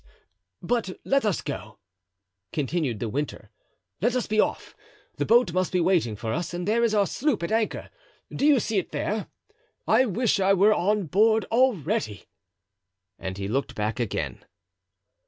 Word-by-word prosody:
"But 205 -1 -1
let 275 -3 +2
us 205 -5 0
go," 110 -7 -6 0.7
continued 150 -4 -1
De 115 - -3
Winter; 140 +7 -4 0.5
"let 240 +5 +2
us 250 - 0
be 215 0 0
off; - - 0 0.4
the - - -1
boat 230 -6 +4
must 185 0 0
be 180 - +1
waiting 170 - +2
for 110 +1 -4
us 175 +2 -3
and 175 +1 -4
there 230 +2 +2
is 225 -2 +2
our 205 -1 +4
sloop 260 - -1
at 170 - -2
anchor—do 230 - -4
you 290 -3 +6
see 220 -3 0
it 185 - -7
there? 215 +1 -2 0.6
I 250 +4 +4
wish 225 +1 +1
I 195 +1 +4
were 205 +3 +5
on 210 +2 +1
board 220 +6 +3
already," 220 - +1 1.0
and 95 0 -5
he 100 0 -3
looked 135 +7 -2
back 105 +2 -2
again. 120 -4 -3
195 Hz, 160 wpm, -26 LUFS, 150-225 Hz, 1.0 s, you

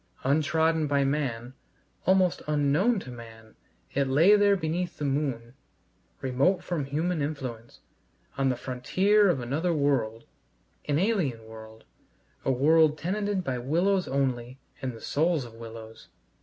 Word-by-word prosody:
Untrodden 160 +3 +2
by 140 -1 +2
man, 130 -4 -2 0.5
almost 185 -2 +3
unknown 150 +10 +2
to 130 - -9
man, 115 -2 -12 0.4
it 140 0 +1
lay 160 +10 +5
there 205 -1 +4
beneath 175 0 -3
the 150 - -3
moon, 135 -4 -2 0.7
remote 135 +9 +1
from 165 -6 -2
human 155 +4 -1
influence, 130 -6 -5 0.5
on 135 0 +1
the 125 - 0
frontier 185 +13 +2
of 170 - +1
another 155 +8 -1
world, 125 -6 0 0.6
an 145 -1 0
alien 165 - 0
world, 110 0 -12 0.6
a - - +1
world 155 +4 +4
tenanted 200 +3 -2
by 130 -4 -2
willows 180 +9 +1
only 130 -2 -2 0.2
and 130 -2 -3
the 115 - -12
souls 160 -2 0
of 115 - -12
willows. 115 -1 -11
140 Hz, 135 wpm, -27 LUFS, 125-170 Hz, 0.7 s, lay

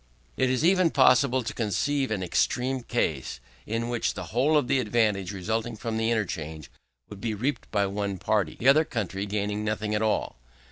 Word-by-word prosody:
It 130 - +1
is 130 +4 +1
even 185 -1 +4
possible 130 -2 +4
to 115 - -4
conceive 130 +6 0
an 100 -4 -2
extreme 125 +8 0
case, 80 - -2 0.3
in 115 +2 -2
which 120 -1 -1
the - - -5
whole 140 +6 +3
of 145 - +1
the 135 - +2
advantage 105 -5 +1
resulting 110 +4 -2
from 110 0 -4
the 110 0 +1
interchange 80 - -3 0.4
would 100 -1 -11
be 110 -2 -2
reaped 125 +5 -2
by 100 -2 +1
one 100 0 -3
party, 95 -3 0
the 125 - -2
other 145 +4 +7
country 100 - -3
gaining 105 +1 -2
nothing 110 0 -2
at 105 - 0
all. 110 - 0
110 Hz, 185 wpm, -27 LUFS, 100-130 Hz, 0.4 s, other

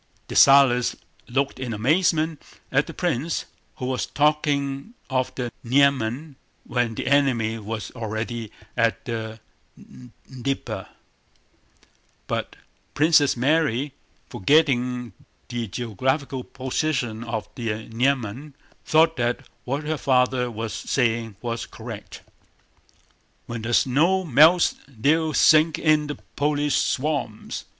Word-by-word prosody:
Dessalles 135 -3 +5 0.3
looked 135 +2 -1
in 125 -3 -3
amazement 155 - +1 0.3
at 135 +2 +2
the - - -6
prince, 165 -2 -1 0.3
who 125 - -5
was 130 -1 -2
talking 145 - 0 0.2
of 130 -1 0
the 120 -2 -3
Niemen 135 +2 +1 0.3
when 120 -3 -1
the - - -4
enemy 125 -5 +2
was 110 0 -5
already 110 -1 -4 0.2
at 115 -2 +1
the 110 -2 -5 0.9
Dnieper, 130 +1 -4 1.4
but - - -3 0.4
Princess 150 -3 +4
Mary, 140 0 +1 0.3
forgetting 125 -3 +1 0.4
the 120 -2 -3
geographical 130 +5 -2
position 130 -4 -2
of 115 -3 -4
the 110 -2 -4
Niemen, 130 +3 -1 0.3
thought 160 +1 +3
that 120 0 -1 0.2
what 140 +4 -2
her 155 +1 -2
father 125 -1 +2
was 115 -1 -5
saying 115 -4 -1
was 115 -1 -3
correct. - - -9 1.2
"When 115 -1 -5
the 115 +1 0
snow 165 +9 +3
melts 160 +3 +5
they'll 150 +5 +1
sink 155 0 +5
in 155 -2 +2
the 145 - -4 0.2
Polish 145 0 +1
swamps. 135 -6 -2
130 Hz, 110 wpm, -24 LUFS, 115-150 Hz, 1.4 s, Dessalles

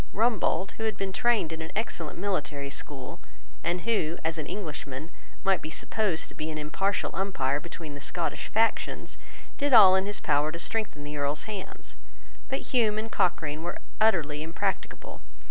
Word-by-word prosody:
Rumbold, 210 -4 +2
who 225 - -2
had 215 -3 0
been 195 -1 -2
trained 225 -6 +2
in 160 - -5
an 160 - -5
excellent 185 -7 -2
military 150 -7 -2
school, 140 -2 -3 0.4
and 175 +1 0
who, 175 -7 +1
as 160 0 0
an 150 - -3
Englishman, 155 -5 -5 0.3
might 195 -3 +3
be 155 - -5
supposed 185 +1 0
to - - -8
be 155 - -4
an 155 - -3
impartial 175 +6 0
umpire 145 -8 0
between 160 -1 -7
the 145 - -8
Scottish 170 +3 -2
factions, 225 +1 0 0.4
did 285 -1 +2
all 200 -5 +10
in 190 +1 +2
his 205 - -1
power 150 +2 +2
to 165 - -5
strengthen 185 -4 -1
the 150 0 -5
Earl's 145 +1 0
hands. 205 -3 -7 0.5
But 270 - -1
Hume 220 -4 +4
and 220 +1 -3
Cochrane 155 -4 +1
were 175 +1 -3 0.2
utterly 155 -9 +3
impracticable. 170 +5 -3
175 Hz, 170 wpm, -29 LUFS, 155-205 Hz, 0.5 s, all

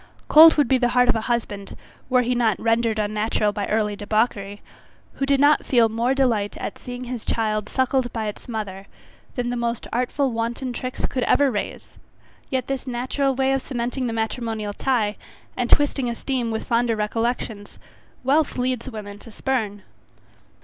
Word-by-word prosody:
Cold 320 +1 +9
would 295 -4 +3
be 260 +1 +3
the 245 - +3
heart 250 0 +5
of 245 - +5
a 225 - 0
husband, 205 -4 -3 0.3
were 250 -1 +4
he 245 +1 0
not 235 -4 +1
rendered 230 -1 +1
unnatural 210 0 0
by 205 -1 -3
early 210 -1 0
debauchery, 205 -1 -1 0.5
who 275 - -2
did 275 -1 +3
not 290 +2 +5
feel 235 -3 +3
more 235 +4 0
delight 230 -7 +1
at - - -5
seeing 245 0 -7
his 245 -2 -5
child 215 -2 -1
suckled 260 -1 +1
by 225 -2 -3
its 210 - -7
mother, 200 -4 -5 0.5
than 245 -1 -1
the - - -2
most 235 -1 -2
artful 255 +3 0
wanton 235 +2 -3
tricks 255 +1 -3
could 260 - -2
ever 285 -2 +4
raise; 205 - -5 0.5
yet 260 -1 -1
this 270 -1 -4
natural 260 +2 -1
way 265 +1 +2
of 270 - 0
cementing 250 0 -3
the - - -2
matrimonial 220 -2 -2
tie, 220 -4 0 0.4
and 245 -1 -1
twisting 275 -3 +3
esteem 240 0 -2
with 220 -1 -3
fonder 235 -1 +1
recollections, 220 -1 -2 0.5
wealth 285 +3 +2
leads 250 0 -1
women 205 -3 -8
to 230 - -13
spurn. 215 -4 -2
235 Hz, 170 wpm, -23 LUFS, 215-255 Hz, 0.5 s, Cold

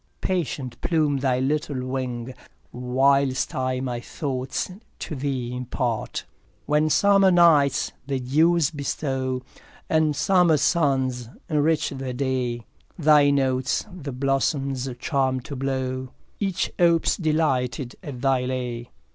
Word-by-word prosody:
patient 140 -9 -3
plume 155 -4 +1
thy 130 -2 +1
little 140 -1 -1
wing, 130 -1 -4 0.4
Whilst 130 +2 +1
I 130 0 -1
my 125 -2 -3
thoughts 130 +4 -4 0.3
to - - -6
thee 130 -3 -3
impart. 125 -2 -3
3 - - -37 0.3
When 150 +1 +2
summer 195 +3 +5
nights 155 -5 +4 0.2
the 135 -2 -1
dews 155 +5 +3
bestow, 135 -3 -2 0.5
And 155 -2 +3
summer 180 -2 +4
suns 130 -6 +1 0.2
enrich 155 +1 +1
the 135 -2 -5
day, 125 -3 -2 0.3
Thy 150 -3 +5
notes 130 -2 +1
the 150 -6 -6
blossoms 135 0 -1
charm 130 -1 0
to 140 +2 -7
blow, 130 -1 -2 0.3
Each 195 -3 -1
opes 170 -2 +4
delighted 135 -7 0
at 140 -9 -7
thy 135 -2 +2
lay. 125 -2 -4
135 Hz, 120 wpm, -24 LUFS, 130-150 Hz, 0.5 s, summer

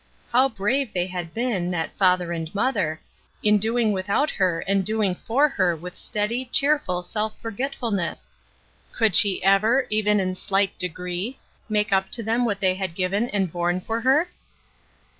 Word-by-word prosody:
How 260 +3 +4
brave 235 +3 -1
they 180 -1 +1
had 180 -3 -6
been, 220 -6 -1
that 170 -3 -3
father 180 -2 +2
and 165 -2 -4
mother, 185 -9 0 0.4
in 210 0 +4
doing 225 +1 +1
without 200 +10 0
her 180 -3 0
and 195 0 +1
doing 215 -2 0
for 255 +10 +1
her 185 - 0
with 180 +3 -9
steady, 230 +5 -2
cheerful 275 -9 +2
self 215 +4 -2
f - - -26
orgetf 250 +5 -4
ulness! 200 -7 -2 0.6
Could 220 -6 +2
she 200 -3 +5
ever, 215 +7 +3
even 210 -1 +2
in 185 -1 -1
slight 195 +1 0
degree, 180 +6 -4 0.3
make 210 -1 +1
up 190 0 +1
to 230 - +2
them 230 +3 +1
what 205 -4 -2
they 185 -1 +3
had 185 -3 -4
given 195 +6 0
and 195 -4 -1
borne 175 +1 -1
for 225 +5 -3
her 280 +8 +3
200 Hz, 170 wpm, -23 LUFS, 180-230 Hz, 0.6 s, she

